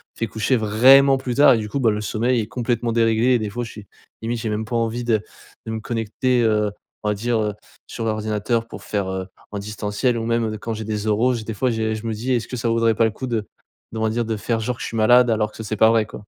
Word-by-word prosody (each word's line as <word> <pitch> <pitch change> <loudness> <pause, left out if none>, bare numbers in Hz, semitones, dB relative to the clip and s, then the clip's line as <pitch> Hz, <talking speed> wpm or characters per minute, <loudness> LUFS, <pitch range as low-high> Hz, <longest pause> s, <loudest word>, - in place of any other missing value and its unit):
fait 115 - -2
coucher 110 +4 0
vraiment 130 +6 +6
plus 130 -2 -4
tard 145 0 +7
et - - +2
du 110 -1 -3
coup, 140 - -2
bah, 115 - +4
le 105 - -2
sommeil 115 +4 0
est 105 - -5
complètement 120 0 -1
déréglé, 115 +2 +3
et 125 - +3
des 105 -2 -3
fois 120 +4 -4
je 115 - -9
suis, 105 -2 -11 0.3
limite 115 +1 -2
j'ai 110 0 -3
même 105 +1 -2
pas 120 - -4
envie 115 +1 -1
de 115 -3 +1 0.4
de 110 - -4
me 110 - -3
connecter, 120 +2 0
heu, 105 -2 +2 0.3
on 105 - 0
va 105 - 0
dire, 115 +3 0
heu, 105 -1 -1 0.3
sur 115 - -5
l'ordinateur 110 +1 -1
pour - - -10
faire, 100 -2 -2
heu, 95 0 -4 0.2
en 105 - -4
distanciel 105 +4 -1
ou 115 - -3
même, 115 0 +1
heu, 110 - -2
d 110 - -5
quand 115 +2 -4
j'ai 110 0 -5
les 105 0 -3
oraux 115 +4 +2
j 115 -3 -4
des 110 - -5
fois 125 +5 0
j'ai 110 -1 -1
je 110 +1 -6
me 115 - -1
dis: 120 +5 -3
«Est-ce 120 -2 -1
que 125 - -5
ça 115 0 -1
vaudrait 115 -1 +2
pas 115 - +3
le 110 - +1
coup 130 +5 -6
d 115 -3 0 0.5
d'on 110 - -4
va 110 - +2
dire 120 +2 -1
de 110 -1 -2
faire 115 +2 -1
genre 125 +3 -2
que - - -11
je - - -3
suis - - -6
malade 120 +3 +5
alors 110 -1 +1
que - - -15
c 110 - -6
c'est 110 0 -3
pas 110 +2 +6
vrai, 115 -1 +3
quoi?» 105 - -10
115 Hz, 295 wpm, -22 LUFS, 110-120 Hz, 0.5 s, tard